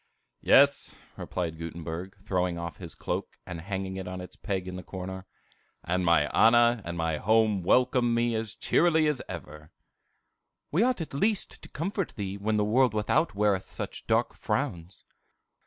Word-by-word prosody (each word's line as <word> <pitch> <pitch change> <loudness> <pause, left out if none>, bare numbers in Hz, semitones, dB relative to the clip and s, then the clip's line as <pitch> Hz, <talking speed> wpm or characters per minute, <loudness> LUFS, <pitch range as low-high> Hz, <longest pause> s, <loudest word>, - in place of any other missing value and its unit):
"Yes," 140 +1 +4 0.2
replied 85 -3 -4
Gutenberg, 85 +3 -6
throwing 90 -3 0
off 85 0 -5
his 85 -5 -8
cloak, - - -4
and 90 -2 -6
hanging 95 +1 -4
it 95 -1 -5
on 90 0 -5
its 90 - -9
peg 95 -3 -3
in 90 - -5
the 90 - -5
corner, 95 0 -7 0.6
"and 90 +2 0
my 85 -3 +4
Anna 120 0 +5
and 85 -1 -5
my 80 -1 0
home 110 +1 +3
welcome 120 +4 +3
me 120 0 +1
as 110 -1 -3
cheerily 160 -2 +3
as 150 -4 +1
ever." 75 -4 -8 1.0
"We 175 +9 +3
at 240 - -1
least 205 +8 0
ought - - -15
to - - -10
comfort 185 +4 -3
thee 100 -2 -4
when 105 +2 -1
the 105 - +2
world 120 +1 +3
without 105 +6 +1
weareth 100 -2 +1
such - - -7
dark - - +2
frowns." 85 +2 -3
95 Hz, 165 wpm, -28 LUFS, 90-120 Hz, 1.0 s, Anna